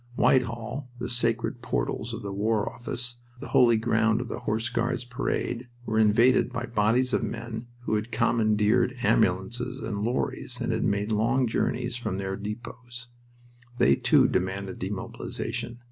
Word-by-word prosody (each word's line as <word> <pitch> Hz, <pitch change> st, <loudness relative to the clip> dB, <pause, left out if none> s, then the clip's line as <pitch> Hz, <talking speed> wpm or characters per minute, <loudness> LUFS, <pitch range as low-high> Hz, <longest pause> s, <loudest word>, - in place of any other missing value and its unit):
Whitehall, 125 Hz, +2 st, +1 dB
the 120 Hz, -, -3 dB
sacred 120 Hz, 0 st, 0 dB
portals -, -, -2 dB
of -, -, -6 dB
the 100 Hz, -1 st, -4 dB
War 105 Hz, +1 st, +1 dB
Office, 120 Hz, 0 st, -5 dB, 0.2 s
the 145 Hz, -, -8 dB
holy 120 Hz, -2 st, +5 dB
ground 110 Hz, -1 st, +2 dB
of 125 Hz, -1 st, -4 dB
the -, -, -4 dB
Horse 115 Hz, -1 st, -1 dB
Guards' 120 Hz, +1 st, -1 dB
Parade, 125 Hz, -1 st, -2 dB, 0.2 s
were 110 Hz, -2 st, +1 dB
invaded 115 Hz, +4 st, +4 dB
by 120 Hz, -1 st, -3 dB
bodies 120 Hz, +3 st, +2 dB
of -, -, +2 dB
men 115 Hz, +1 st, -5 dB
who 120 Hz, -, -2 dB
had 110 Hz, +2 st, -1 dB
commandeered 115 Hz, +1 st, +2 dB
ambulances 110 Hz, +3 st, +1 dB
and 105 Hz, -2 st, -3 dB
lorries 120 Hz, +4 st, -2 dB
and -, -, -1 dB
had -, -, 0 dB
made 100 Hz, +2 st, 0 dB
long 115 Hz, +5 st, +2 dB
journeys 120 Hz, +1 st, -1 dB
from 110 Hz, -5 st, -3 dB
their 95 Hz, 0 st, -2 dB
depots. 120 Hz, +4 st, -7 dB, 0.7 s
They, -, -, +5 dB
too, -, -, +4 dB
demanded 95 Hz, +1 st, -2 dB
demobilization. 105 Hz, +4 st, -4 dB
115 Hz, 150 wpm, -27 LUFS, 105-120 Hz, 0.7 s, holy